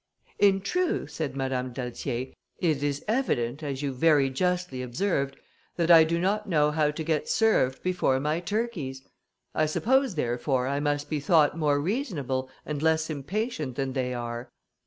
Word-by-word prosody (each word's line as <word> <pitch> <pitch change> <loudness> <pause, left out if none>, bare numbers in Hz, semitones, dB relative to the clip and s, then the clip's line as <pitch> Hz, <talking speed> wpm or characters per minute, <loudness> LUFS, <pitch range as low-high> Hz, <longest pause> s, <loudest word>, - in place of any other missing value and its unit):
"In 195 -1 +4
truth," 340 - -1
said 150 -4 -3
Madame 130 -1 -2
d'Altier, 125 +1 -4 0.2
"it 155 -6 +1
is 145 -1 -2
evident, 155 - 0
as 140 -2 -4
you 140 -2 -1
very 140 0 +3
justly 180 -3 -1
observed, 140 +1 -1 0.4
that 170 0 +2
I 165 -1 +9
do 170 +1 0
not 205 +3 0
know 150 -3 +3
how 150 -1 +2
to 150 +2 -4
get 155 -1 -1
served 215 - +2
before 180 -8 +1
my 150 +4 0
turkeys; 175 - -3 0.5
I 155 - +2
suppose, 260 - +2
therefore, 125 -1 0
I 140 +2 -1
must 145 0 -1
be 155 - -1
thought 150 0 +4
more 150 -3 +2
reasonable 145 - -2 0.2
and 150 -2 -3
less 160 0 +2
impatient 155 - -3
than 135 0 -2
they 130 -1 -1
are." 120 0 -5
150 Hz, 160 wpm, -27 LUFS, 135-175 Hz, 0.5 s, I